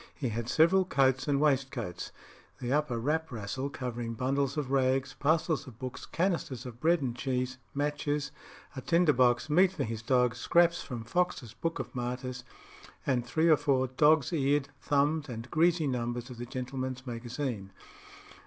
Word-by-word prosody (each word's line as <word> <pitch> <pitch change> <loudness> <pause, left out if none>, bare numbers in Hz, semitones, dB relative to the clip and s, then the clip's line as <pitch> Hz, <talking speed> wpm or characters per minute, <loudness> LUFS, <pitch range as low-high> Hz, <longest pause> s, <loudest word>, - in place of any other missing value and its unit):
He 130 - -2
had 115 +1 -3
several 175 +4 +5
coats 135 -6 +2
and 140 -1 +2
waistcoats 135 -9 0 0.5
the 125 +1 -2
upper 150 -5 +1
wrap 155 +7 -1
rascle 120 +5 -4
covering 120 -3 -4
bundles 135 +3 0
of 140 -3 -2
rags, 135 0 +2
parcels 155 +1 +1
of 120 -4 -11
books, 130 +1 -7
canisters 165 - -1
of 120 -2 -8
bread 165 +1 +3
and 120 -3 -2
cheese, 125 0 -2 0.2
matches, 145 0 -1 0.4
a 130 - -5
tinder 170 -1 +3
box, 120 0 +3
meat 180 +5 +4
for - - -2
his 110 -1 -4
dog, 125 0 +2
scraps 170 +7 +3
from 120 -3 -6
Fox's 145 - -1
Book 165 +7 -3
of - - -6
Martyrs, 125 0 -4 0.6
and 125 -3 +1
three 160 +7 +1
or 155 -2 +6
four 130 -2 +2
dog's 150 +3 +3
eared, 140 -2 +1
thumbed, 145 +1 +1
and 120 +1 -7
greasy 165 0 +3
numbers 120 -1 -2
of 120 - -10
the 120 - -5
Gentleman's 130 0 -4
Magazine. 120 -4 -4
130 Hz, 160 wpm, -30 LUFS, 125-150 Hz, 0.6 s, or